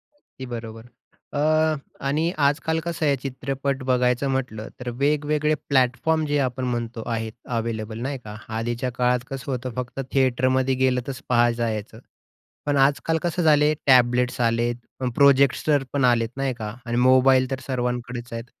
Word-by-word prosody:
अगदी 130 - -12
बरोबर. 115 -2 -7 0.5
अ, 145 - -1 0.7
आणि 155 +5 +1 0.2
आजकाल 160 +3 0
कसं 170 -2 -2
आहे, 140 -1 +3
चित्रपट 135 0 -3
बघायचं 125 +1 +2
म्हटलं 115 -5 -3
तर 125 -1 -4
वेगवेगळे 150 +1 +1 0.2
प्लॅटफॉर्म, 135 +4 +2
जे 145 0 0
आपण 130 +1 -4
म्हणतो, 120 -2 -3
आहेत 110 -1 -3 0.2
अवेलेबल, 110 -1 -3
नाही 135 +2 -3
का? 105 -1 -8 0.2
आधीच्या 120 +3 -2
काळात 125 +1 +1
कसं 135 0 -5
होतं, 125 -1 -3
फक्त 125 +1 -5
थिएटरमध्ये 130 0 +2
गेलं 130 -1 +2
तरच 135 0 -5
पहायचायचं. 115 -2 0 0.7
पण 145 -1 +1
आजकाल 140 +4 +2
कसं 175 0 -1
झालं 150 -2 +5
आहे, 150 - +3
टॅबलेट्स 125 -1 +4
आलेत, 120 +1 +1 0.4
प्रोजेक्टर 140 +1 +4
पण 140 -2 +2
आलेत, 115 -2 +3
नाही 135 -1 0
का? 110 -3 -6
आणि 120 0 -2
मोबाईल 130 +1 +5
तर 130 - -2
सर्वांकडेच 125 -2 -3
आहेत, 115 0 -5
130 Hz, 150 wpm, -24 LUFS, 120-140 Hz, 0.7 s, झालं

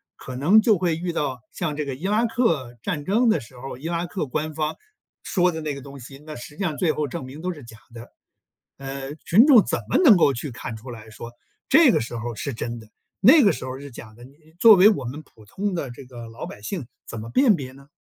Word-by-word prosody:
可 130 - -9
能 180 +12 +5
就 215 -2 +3
会 175 -2 0
遇 175 +1 -4
到 135 -6 -2
像 155 -4 -3
这 150 -1 -3
个 135 - -4
伊 170 +9 -5
拉 215 +3 +2
克 165 - 0
战 145 +5 -3
争 230 +5 +2
的 190 - +3
时 125 +1 -14
候， 130 0 -8
伊 150 +6 -7
拉 170 0 -2
克 175 -2 -4
官 155 +3 -3
方 155 0 -2 0.5
说 180 -1 +1
的 160 - -5
那 155 -2 -3
个 140 - -8
东 140 0 -11
西， 135 +3 -12
那 155 -1 -8
实 150 +5 -10
际 200 - -3
上 155 -6 -2
最 170 -4 +2
后 150 -1 -2
证 130 - -6
明 135 +4 -10
都 180 +1 -2
是 150 - -12
假 115 -1 -13 0.2
的。 120 0 -11 0.7
呃， 135 0 -6
群 195 - +4
众 250 -8 +8
怎 - - -1
么 - - +2
能 240 -10 +8
够 145 -5 +4
去 125 +3 -5
看 115 -1 -7
出 125 +3 -10
来 110 -1 -11
说 115 +2 -9 0.4
这 315 -3 +6
个 - - +2
时 120 +1 -6
候 115 0 -5
是 140 +5 -4
真 115 +1 -5
的， 110 - -14 0.3
那 265 - +7
个 200 - +5
时 130 -4 -6
候 130 +1 -6
是 140 -1 -10
假 110 -2 -11
的， 120 - -15
你 130 +2 -15 0.3
作 225 -2 +9
为 195 +3 +7
我 195 -11 -1
们 135 +6 -6
普 110 -7 -20
通 200 - -3
的 140 -7 -4
这 130 - -11
个 120 -2 -10
老 115 +1 -8
百 - - -11
姓 145 - -5 0.2
怎 115 - -6
么 110 +2 -8
辨 240 - +4
别 130 -5 -7
呢？ 140 +1 -17
145 Hz, 280 characters per minute, -23 LUFS, 125-180 Hz, 0.7 s, 作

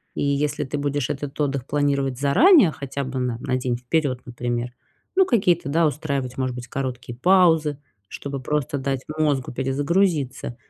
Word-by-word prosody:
И - - -1
если 145 +1 0
ты 145 +2 -4
будешь 145 -1 -1
этот 145 0 -5
отдых 140 -3 -1
планировать 140 -3 0
заранее, 210 - +6
хотя 140 0 -5
бы 130 0 -4
на 125 -2 -1
на 130 0 -1
день 125 -1 -1
вперед, 125 0 -1
например, 120 -1 -3 0.4
ну, 380 0 +5
какие-то, 180 - +2
да, 165 +2 +3
устраивать, 140 -4 -3
может 130 -1 -1
быть, 125 0 -7
короткие 125 -2 -5
паузы, 160 -3 +4 0.3
чтобы 140 -1 -6
просто 145 +1 -1
дать 135 -1 -2 0.2
мозгу 145 -4 0
перезагрузиться, 140 0 0
140 Hz, 155 wpm, -23 LUFS, 130-150 Hz, 0.4 s, заранее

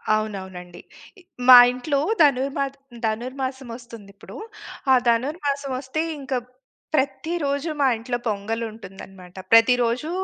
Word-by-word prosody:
అవునవునండి. 190 -4 -6 0.7
మా 255 - +11 0.2
ఇంట్లో 275 +3 -2 0.2
ధనుర్మా 275 0 +2 0.4
ధనుర్మాసం 260 +3 -4
వస్తుంది 230 -4 -12
ఇప్పుడు. - - -13 0.6
ఆ - - +7
ధనుర్మాసం 280 +3 -1
వస్తే 275 +4 -3 0.2
ఇంక 270 -1 -6 0.6
ప్రతి 285 +4 -1
రోజు 280 +3 -2
మా 270 - +4
ఇంట్లో 240 +2 -3
పొంగల్ 220 +2 -2
ఉంటుందన్నమాట. 195 -3 -13 0.2
ప్రతిరోజు 245 +5 +4
250 Hz, 105 wpm, -23 LUFS, 215-275 Hz, 0.7 s, మా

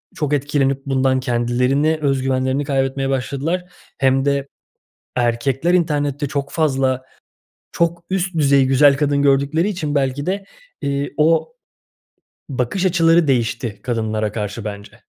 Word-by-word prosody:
çok 150 -2 -1
etkilenip 140 -1 0
bundan 130 -1 +1
kendilerini 125 +5 +1
öz 135 -2 +1
güvenlerini 130 +1 0
kaybetmeye 135 -1 -1
başladılar 140 +7 -2 0.3
hem 135 0 +2
de 140 -1 0 0.7
erkekler 130 +7 +1
internette 145 -4 0
çok 140 0 -3
fazla, 135 -4 +1 0.7
çok 170 0 0
üst 190 -1 -1
düzey 140 -2 +4
güzel 135 +1 +5
kadın 145 -1 +1
gördükleri 140 +6 +2
için 160 -8 -3
belki 140 0 0
de, 195 +2 -2 0.4
eee, 140 0 -2
o 165 - +2 0.9
bakış 135 +8 -1
açıları 165 -2 +3
değişti 120 -3 -1
kadınlara 110 -3 -2
karşı 105 0 -4
bence. 100 -1 -8
140 Hz, 125 wpm, -19 LUFS, 130-150 Hz, 0.9 s, güzel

